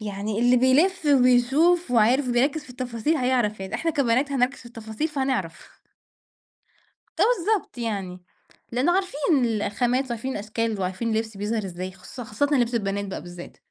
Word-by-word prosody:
يعني 210 0 -4
اللي 245 +1 +4
بيلف 300 +8 +3
وبيشوف 270 +5 +4
وعارف 245 +3 +3
وبيركز 275 +5 +1
في 255 - -14
التفاصيل 250 +4 -2
هيعرف 245 -6 0
يعني، 190 0 -6
إحنا 330 - 0
كبنات 275 0 +1
هنركز 265 +1 +1
في 240 - -14
التفاصيل 225 +5 -4
فهنعرف. 265 - -3 1.4
فبالضبط 420 - +1
يعني، 195 -6 -4 0.5
لأنه 260 +9 +2
عارفين 370 -5 -1 0.2
ال 225 -3 0
الخامات 245 +6 0
وعارفين 235 +3 -3
الأشكال 220 0 -3
وعارفين 190 +5 -2
اللبس 220 -1 -2
بيظهر 210 0 -2
إزاي 185 +1 -6
خص 195 +6 -11
خاصةً 225 +5 -1
لبْس 245 -3 +2
البنات 200 -2 -1
بقى 195 - -6
بالذات. 175 0 -11
240 Hz, 150 wpm, -24 LUFS, 210-275 Hz, 1.4 s, اللي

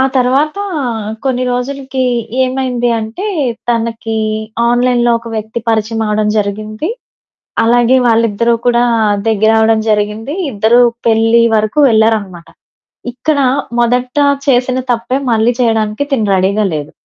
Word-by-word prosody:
తర్వాత 270 +7 +1 0.7
కొన్ని 255 -1 0
రోజులకి 265 +1 -3 0.4
ఏమైంది 255 -2 -1
అంటే 225 - -5 0.4
తనకి 225 -1 -2 0.5
ఆన్లైన్‌లో 240 0 +2
ఒక 230 - -11
వ్యక్తి 220 +2 -4
పరిచయం 225 0 -1
అవడం 210 0 0
జరిగింది. 215 - -3 0.8
అలాగే 240 +2 +3
వాళ్ళిద్దరూ 230 0 +2
కూడా 240 0 +3 0.5
దగ్గరవడం 220 +1 +3
జరిగింది. 210 +6 -1 0.2
ఇద్దరూ 225 +2 +3 0.3
పెళ్లి 225 +1 +3
వరకు 215 +5 0
వెళ్లారనమాట. 220 -6 0 0.6
ఇక్కడ 285 +5 -1 0.4
మొదట 250 +3 0 0.3
చేసిన 255 -1 +2
తప్పే 240 +2 -1
మళ్ళీ 225 +1 +2
చేయడానికి 225 0 0
తిను 225 -6 0
రెడీగా 195 +3 +1
లేదు. 150 -1 -5
230 Hz, 105 wpm, -13 LUFS, 220-250 Hz, 0.8 s, అలాగే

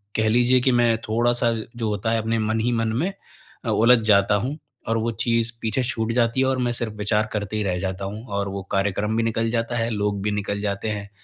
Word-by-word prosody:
कह 110 0 +2
लीजिए 125 +3 +4
कि 130 - +3
मैं 120 -2 +3
थोड़ा-सा 120 +1 +2 0.3
जो 115 -2 -1
होता 105 +2 -1
है 115 - +2
अपने 115 +1 0
मन 110 +1 0
ही 120 +2 +1
मन 115 -1 0
में 195 +2 -1 0.5
अ, - - -1
उलझ 120 +2 +5
जाता 100 -1 +5
हूँ। 130 +9 -2 0.3
और 115 - +2
वो 115 +1 0
चीज़ 115 -1 +1
पीछे 110 +3 0
छूट 115 -2 -2
जाती 115 +1 +2
है - - +3
और 130 0 +1
मैं - - 0
सिर्फ़ 115 -2 -3
विचार 105 +1 +1
करते 105 -1 -3
ही 105 - 0
रह 90 -3 -1
जाता 95 +1 -3
हूँ 105 +3 -6
और 100 0 -1
वो 100 0 -4
कार्यक्रम 100 +2 0
भी 115 - +2
निकल 115 0 0
जाता 115 +1 -1
है 115 0 0
लोग 105 -2 -1
भी 105 - 0
निकल 100 0 -2
जाते 100 +1 -2
हैं। 100 -1 -4
110 Hz, 240 wpm, -23 LUFS, 105-115 Hz, 0.5 s, उलझ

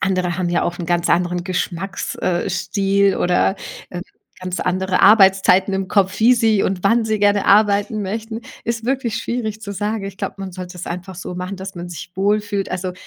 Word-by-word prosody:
andere 185 -2 0
haben 180 -2 -1
ja 175 - +1
auch 175 - -2
'n 175 - -4
ganz 175 0 +1
anderen 175 0 +1
Geschmacks 185 +1 -3
äh, 175 -1 -1
Stil 200 -1 +1
oder, 180 +2 +2 0.3
äh, 175 - -5 0.4
ganz 185 0 -4
andere 185 +1 0
Arbeitszeiten 195 -2 +5
im 190 -1 -2
Kopf, 195 0 +1
wie 240 +3 +6
sie 225 -4 +2
und 190 0 -2
wann 230 +2 +3
sie 215 -1 0
gerne 205 0 +2
arbeiten 205 +1 +3
möchten. 220 +3 -4 0.2
Ist 230 -1 -3
wirklich 250 -3 -1
schwierig 225 -2 -3
zu 200 -2 -5
sagen. 205 +2 -2
Ich 195 0 -7
glaube, - - -3
man 195 -1 -6
sollte 180 0 -8
es 180 - -6
einfach 180 +2 -6
so 180 0 -7
machen, 180 +2 -5
dass 190 +1 -7
man 175 0 -7
sich 175 +1 -8
wohlfühlt. 205 0 0
Also, 185 0 -3
195 Hz, 195 wpm, -20 LUFS, 180-210 Hz, 0.4 s, wie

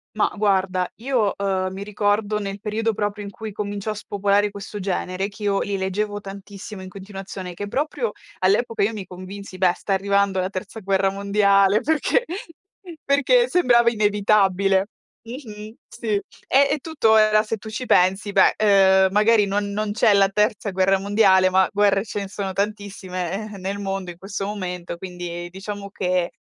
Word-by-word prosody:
Ma 215 - +2
guarda 190 -3 +1
io, 235 -4 0
uhm, 190 -1 0
mi 195 +1 -6
ricordo 205 +1 0
nel 200 -1 -5
periodo 220 +2 -1
proprio 205 0 -3
in 200 - -6
cui 220 +2 -8
cominciò 205 +1 -4
a - - -2
spopolare 205 0 0
questo 205 +1 -8
genere, 190 0 -2
che 210 +1 -11
io 200 -1 +1
li 200 -1 -2
leggevo 205 +2 -2
tantissimo 200 0 -9
in 185 - -9
continuazione, 190 -2 -8
che 205 +4 -6
proprio 265 -2 -2 0.3
all'epoca 210 +5 +1
io 215 +3 +1
mi 205 -3 -6
convinsi: 185 +1 -9
"Beh 180 -2 +4
sta 200 - -3
arrivando 200 0 +1
la 185 0 -1
terza 195 +3 -6
guerra 195 -1 +1
mondiale" 200 0 +3
perché 320 - +1 0.8
perché 285 - +3
sembrava 240 -9 +4
inevitabile. 200 -2 +2 0.3
Mh-mh, 220 -3 -9
sì, 235 -1 -9 0.4
eh, 275 +1 +5
è 300 - +1
tutto 275 -8 +2
era 215 0 +4
se 220 +1 -3
tu 220 - -10
ci 220 +4 -5
pensi, 190 0 +2
beh, - - +5
ehm, 190 -2 +5
magari 210 +1 +4
non 200 +1 -1
non 210 +1 -2
c'è 210 0 +3
la 195 -1 +4
terza 210 0 0
guerra 190 +1 +2
mondiale, 195 -2 +4
ma 190 0 +3
guerre 200 -1 +2
ce 205 - -4
ne 200 - -5
sono 195 -1 -4
tantissime, 200 -1 -4
eh, - - -8
nel 195 +2 -3
mondo 195 -2 -4
in 170 - -14
questo 195 +2 -5
momento, 180 -4 -5
quindi 175 -1 -6
diciamo 200 +1 -7
che 180 -2 -1
200 Hz, 170 wpm, -22 LUFS, 190-215 Hz, 0.8 s, eh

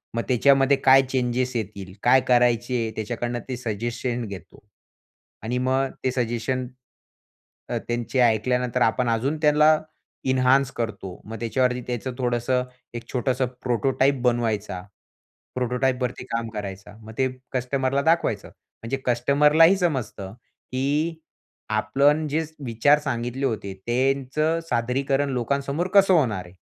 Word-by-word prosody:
मग 115 - +1
त्याच्यामध्ये 135 +2 +4
काय 135 0 +8
चेंजेस 125 -1 -1
येतील, 100 -4 -5
काय 130 +2 +5
करायचे, 120 -1 +2
त्याच्याकडनं 120 +2 -3
ते 130 - -3
सजेशन 120 +1 -3
घेतो. 100 -5 -10 0.8
आणि 120 +3 -2
मग 130 +1 0
ते 130 - +1
सजेशन, 125 +1 -2 1.0
तर - - -1
त्यांचे 120 +2 -2
ऐकल्यानंतर, 120 +1 +1
आपण 120 +2 +2
अजून 125 +7 0
त्यांना 150 0 +5 0.5
एन्हान्स 130 +1 +3
करतो, 100 -7 -5
मग 110 +1 -7
त्याच्यावरती 125 +2 0
त्याचं 125 +1 -3
थोडंसं 125 0 0 0.3
एक 120 - -7
छोटंसं 130 +1 0 0.2
प्रोटोटाइप 130 +2 +1
बनवायचा. 110 -6 0 0.7
प्रोटोटाइपवरती 125 0 -1
काम 115 -1 -2
करायचा. 100 -2 -7
मग 110 0 -11
ते 130 - +2 0.3
कस्टमरला 130 +2 0
दाखवायचं. 165 +3 +1 0.4
म्हणजे 125 +4 -2
कस्टमरलाही 150 +8 +4
समजतं 130 - -2 0.4
की 145 +6 0 0.5
आपण 140 +9 +2
जे 155 +3 0 0.2
विचार 125 +6 +3
सांगितले 125 -1 -3
होते, 105 -5 -3
त्यांचं 135 +6 +1
सादरीकरण 135 +4 0
लोकांसमोर 140 +6 -1
कसं 195 -1 +6
होणार 110 - +1
आहे. 90 +1 -16
125 Hz, 120 wpm, -24 LUFS, 115-135 Hz, 1.0 s, काय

